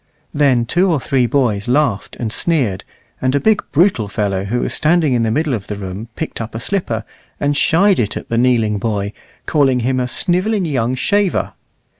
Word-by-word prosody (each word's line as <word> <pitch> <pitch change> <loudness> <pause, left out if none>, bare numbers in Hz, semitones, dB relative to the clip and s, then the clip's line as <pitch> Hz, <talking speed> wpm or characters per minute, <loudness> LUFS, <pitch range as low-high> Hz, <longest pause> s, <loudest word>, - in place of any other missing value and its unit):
Then 135 -5 +3
two 175 +9 +2
or 155 - +1
three 130 -2 +1
boys 120 -7 0
laughed 125 -6 0
and 110 -3 -2
sneered, 125 - 0 0.4
and 130 +1 +1
a - - +3
big, 220 +6 +2
brutal 160 - +2
fellow 100 -2 -2
who 120 +5 -1
was - - -2
standing 155 -3 +2
in 120 - +1
the 115 - +1
middle 150 +5 0
of 105 -4 -4
the 105 - -4
room 100 +2 -6
picked 160 - -4
up 110 0 -7
a - - -3
slipper, 120 - -2 0.4
and 145 0 0
shied 185 +7 +3
it 105 -3 -1
at - - -8
the 115 - -1
kneeling 115 -4 +2
boy, 100 -1 -2 0.3
calling 135 -5 +2
him 130 +2 0
a 125 - -1
snivelling 185 - +1
young 130 -5 0
shaver. 200 +6 0
125 Hz, 195 wpm, -17 LUFS, 110-155 Hz, 0.4 s, Then